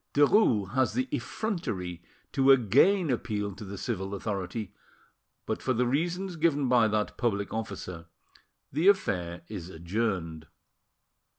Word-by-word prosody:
Derues 140 - +4
has 130 -1 +2
the 255 +1 0
effrontery 115 - -3 0.3
to 135 -1 +3
again 140 - +4
appeal 105 -4 -2
to 100 - -10
the 100 0 -7
civil 95 +2 -3
authority, 100 +1 -4 0.7
but, - - -3
for 130 - +1
the 125 +1 +1
reasons 175 +7 -1
given 150 -4 +2
by 120 -3 +5
that 105 0 -1
public 100 -5 -1
officer, 95 -6 -5 0.7
the 160 +7 +2
affair 90 - +2
is 95 -5 -7
adjourned. 85 -3 -3
110 Hz, 125 wpm, -28 LUFS, 95-145 Hz, 0.7 s, by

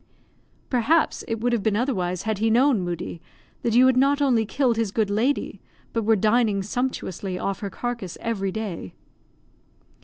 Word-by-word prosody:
"Perhaps 280 +7 +2
it 225 -1 -2
would 245 +1 +1
have 235 - +1
been 215 0 +1
otherwise 185 -8 -1
had 220 -2 -2
he 225 +1 +2
known, 245 -1 +4
Moodie, 175 -1 -5 0.4
that 230 -1 0
you 250 +2 +7
had 260 -1 +4
not 280 +2 +3
only 245 -6 +2
killed 255 -1 +1
his 225 -2 0
good 210 -1 0
lady, 240 +8 0 0.3
but 230 - 0
were 220 +1 +4
dining 215 -1 +2
sumptuously 200 -5 -3
off 195 +1 -3
her 200 - -4
carcass 230 -4 -5
every 195 -4 -2
day." 190 - -5
225 Hz, 165 wpm, -24 LUFS, 195-245 Hz, 0.4 s, you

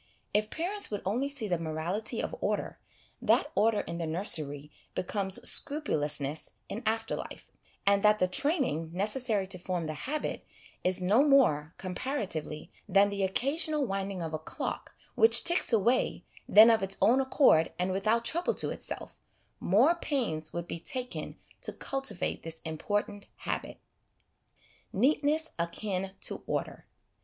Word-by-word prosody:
If 215 +1 +1
parents 380 - +1
would 205 - -4
only 245 +9 0
see 275 -6 -4
the 175 -3 0
morality 165 +6 -2
of - - -4
order, - - -2 0.4
that 245 +5 +2
order 215 +1 +2
in 170 - -6
the 165 -1 -3
nursery 155 -4 +1 0.2
becomes 195 0 -1
scrupulousness 150 - +1 0.2
in 220 - -5
after 225 0 0
life, - - -9 0.3
and 200 0 +4
that 210 0 +5
the 185 - +2
training 265 - 0
necessary 210 +1 +2
to 185 -1 -6
form 175 -2 -3
the 155 - -3
habit 290 - -4 0.4
is 185 0 +1
no 205 +8 +4
more, 205 - +3
comparatively, 185 - -3 0.2
than 200 +1 +4
the 200 0 -3
occasional 285 - +1
winding 195 -3 -3
of 160 -1 -5
a 155 - -2
clock, 155 - -6 0.2
which 450 - +6
ticks 345 -2 +3
away 235 +3 +1 0.2
then 220 +3 +9
of 225 - +2
its 195 0 -1
own 235 +7 +4
accord 260 - +4
and 180 +1 -1
without 215 +5 +1
trouble 345 +2 +1
to - - -1
itself, - - -5 0.4
more 235 - +4
pains 235 - -2
would 170 0 -5
be 170 - -5
taken 250 +7 -5 0.3
to - - -1
cultivate 270 -8 -3
this 165 0 -6
important 205 +5 -3
habit. - - -4 1.1
Neatness 295 +7 +1
Akin 190 +2 -3
to - - -1
Order. - - -4
205 Hz, 145 wpm, -29 LUFS, 175-260 Hz, 1.1 s, then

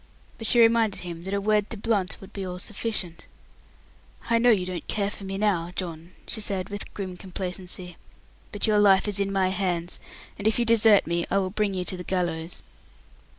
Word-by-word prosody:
But 225 - -3
she 240 - +5
reminded 225 -2 +4
him 170 -1 -7
that 190 - -3
a - - +1
word 210 0 +1
to 225 - -5
Blunt 200 -3 0
would 195 - -13
be 195 - -4
all 180 -1 -4
sufficient. 185 -4 -4 1.0
"I 230 - +5
know 245 +1 +5
you 200 -6 +4
don't 180 -1 -5
care 200 -1 0
for 200 - -8
me 195 0 -4
now, 185 -5 +1
John," 170 -1 -5
she 220 - -3
said, 195 -3 -2
with 205 0 -3
grim 185 -3 -5
complacency; 180 -1 -5 0.5
"but 205 - -1
your 215 -1 +3
life 195 -1 +5
is 205 -1 -2
in 200 0 0
my 190 -1 +2
hands, 180 -2 -1 0.4
and 205 - 0
if 220 - +2
you 240 - +2
desert 225 -2 +6
me 170 +1 -1
I 195 - +2
will 190 -1 0
bring 205 -1 0
you 180 -1 -2
to 185 - -2
the 180 - -6
gallows." 175 -3 -2
195 Hz, 205 wpm, -26 LUFS, 180-210 Hz, 1.0 s, desert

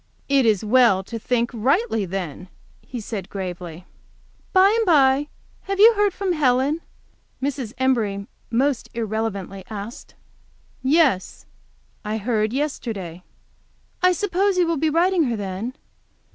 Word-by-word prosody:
"It 275 -3 +3
is 215 -1 +2
well 220 -4 +4
to 230 +4 -6
think 235 +1 0
rightly, 250 - +1
then," 180 -2 -5 0.3
he 250 - -7
said, 210 -4 -6
gravely. 180 -3 -6 0.7
"By 390 +2 +5
the 450 - +1
bye, 280 -3 +4 0.4
have 395 0 -1
you 450 +3 +8
heard 415 -1 +2
from 375 -1 -2
Helen?" 280 +1 +2 0.6
Mrs. 265 -4 -3
Embury 225 -7 0 0.2
most 260 +2 0
irreverently 215 -4 -3
asked. 215 +2 -8 0.7
"Yes, 270 - +2 0.6
I, 215 +1 -2
heard 215 -1 0
yesterday." 230 - -4 0.8
"I 365 0 +5
suppose 390 +1 0
you 360 - +4
will 335 -1 0
be 315 +2 +1
writing 340 +1 +2
her, 240 -3 -1
then? 205 +4 -5
245 Hz, 130 wpm, -22 LUFS, 205-310 Hz, 0.8 s, you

